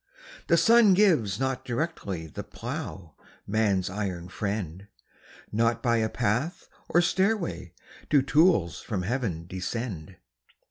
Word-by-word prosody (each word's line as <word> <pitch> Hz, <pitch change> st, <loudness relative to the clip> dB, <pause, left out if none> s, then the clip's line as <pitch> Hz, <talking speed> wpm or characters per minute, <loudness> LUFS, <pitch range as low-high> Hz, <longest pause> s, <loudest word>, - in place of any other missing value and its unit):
The 170 Hz, -, +4 dB
sun 220 Hz, +2 st, +6 dB
gives 150 Hz, -, +3 dB
not 130 Hz, 0 st, -1 dB
directly 120 Hz, -, -3 dB
The 80 Hz, -, -7 dB
plough, 85 Hz, -6 st, -7 dB, 0.3 s
man's 100 Hz, -3 st, +1 dB
iron 95 Hz, -3 st, -4 dB
friend; 100 Hz, -2 st, -4 dB, 0.6 s
Not 115 Hz, +2 st, +1 dB
by 120 Hz, -2 st, +3 dB
a 110 Hz, -1 st, +1 dB
path 125 Hz, -, -1 dB, 0.2 s
or 175 Hz, -, +4 dB
stairway 190 Hz, -, 0 dB, 0.3 s
Do 145 Hz, -3 st, +4 dB
tools 145 Hz, -, +3 dB
from 100 Hz, -6 st, -3 dB
Heaven 100 Hz, -7 st, -2 dB
descend. 95 Hz, -1 st, -5 dB
110 Hz, 120 wpm, -27 LUFS, 95-150 Hz, 0.6 s, sun